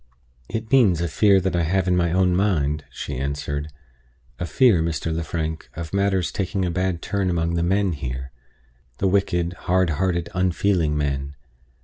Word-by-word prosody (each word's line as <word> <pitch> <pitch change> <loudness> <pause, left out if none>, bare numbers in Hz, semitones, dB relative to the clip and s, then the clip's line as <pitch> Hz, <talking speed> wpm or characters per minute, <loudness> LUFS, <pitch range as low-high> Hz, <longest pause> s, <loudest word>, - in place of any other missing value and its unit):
"It 110 +1 -4
means 110 -11 +5
a 85 - 0
fear 100 +5 +4
that 95 0 -1
I 85 - +2
have 95 +3 +1
in 90 - +3
my 85 -2 +1
own 90 0 +3
mind," 75 -7 +1
she - - -6
answered 70 +1 -3 0.7
"a 85 - -2
fear, 100 - +4
Mr. 80 0 -2
Lefrank, 80 -1 -3
of 85 +1 -6
matters 100 -2 +1
taking 95 0 -1
a 90 - -1
bad 90 -1 -1
turn 100 -2 -1
among 85 -1 0
the 85 - 0
men 95 +2 +2
here 65 -3 -5 0.7
the 95 - +1
wicked, 90 -3 +1 0.2
hard 95 -2 +3
hearted, 85 +2 -1
unfeeling 90 -3 +1
men. 70 -1 -2
85 Hz, 165 wpm, -23 LUFS, 80-95 Hz, 0.7 s, means